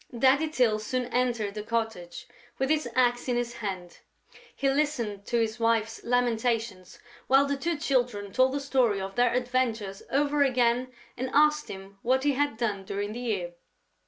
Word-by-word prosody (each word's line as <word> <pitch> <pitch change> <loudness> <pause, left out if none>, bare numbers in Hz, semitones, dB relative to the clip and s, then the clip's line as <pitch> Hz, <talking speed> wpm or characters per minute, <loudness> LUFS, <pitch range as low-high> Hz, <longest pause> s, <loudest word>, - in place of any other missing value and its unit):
Daddy 270 +5 +4
Tyl 245 -8 +2
soon 250 +4 -2
entered 235 -5 0
the 210 - -5
cottage, 220 -5 -4 0.3
with 265 +2 0
his 305 -5 +1
axe 245 -1 +2
in 250 - +1
his 240 0 -2
hand; 185 -5 -6 0.6
he 275 - 0
listened 270 -8 -1
to 240 - 0
his 225 0 -1
wife's 230 -1 0
lamentations, 230 -5 -1 0.3
while 270 +2 +5
the 280 0 -1
two 330 +4 -2
Children 245 -9 -1
told 260 +1 +3
the 285 - -1
story 255 -7 +1
of 195 0 -5
their 245 +1 +3
adventures 245 -5 -1
over 285 +1 +1
again 250 -1 +2 0.2
and 260 +1 -3
asked 300 +1 +4
him 195 +1 -10
what 260 +2 +1
he 290 - +3
had 285 -4 0
done 210 -5 -1
during 200 +2 -4
the 240 - -6
year. 200 -8 -2
240 Hz, 170 wpm, -27 LUFS, 215-265 Hz, 0.6 s, while